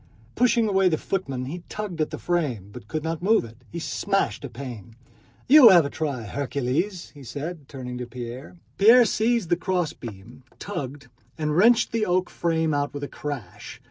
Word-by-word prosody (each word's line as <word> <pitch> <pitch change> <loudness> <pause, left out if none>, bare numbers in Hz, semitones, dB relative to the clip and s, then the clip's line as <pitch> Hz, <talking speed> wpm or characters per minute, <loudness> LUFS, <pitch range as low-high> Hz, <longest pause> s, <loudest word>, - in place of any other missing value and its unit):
Pushing 235 -2 +3
away 190 -2 +3
the 160 - +1
footmen 135 -11 -3
he 170 +7 -6
tugged 205 -6 -4
at 155 - 0
the - - -6
frame, 140 - -2
but 100 - -11
could 155 +7 -3
not 165 0 -3
move 215 - +3
it. 115 0 -13
He 170 - -6
smashed 195 +3 -1
a 140 - -5
pane. 120 -3 -9 0.5
"You 275 -3 +10
have 175 -6 +7
a 140 - -4
try, 140 -7 -3
Hercules," 140 - -2
said 145 +7 -5
he, 145 - -22
turning 125 -3 -7
to 125 - -5
Pierre. 125 +6 -8 0.2
Pierre 230 +4 +8
seized 225 -4 +1
the 175 - +3
crossbeam, 130 - -4 0.2
tugged, 145 -7 -6 0.3
and 150 -1 -1
wrenched 230 +6 +5
the 225 -2 0
oak 180 0 +1
frame 160 -2 0
out 145 0 -1
with 145 - -5
a - - -2
crash. 140 -14 -7
155 Hz, 180 wpm, -25 LUFS, 130-190 Hz, 0.5 s, You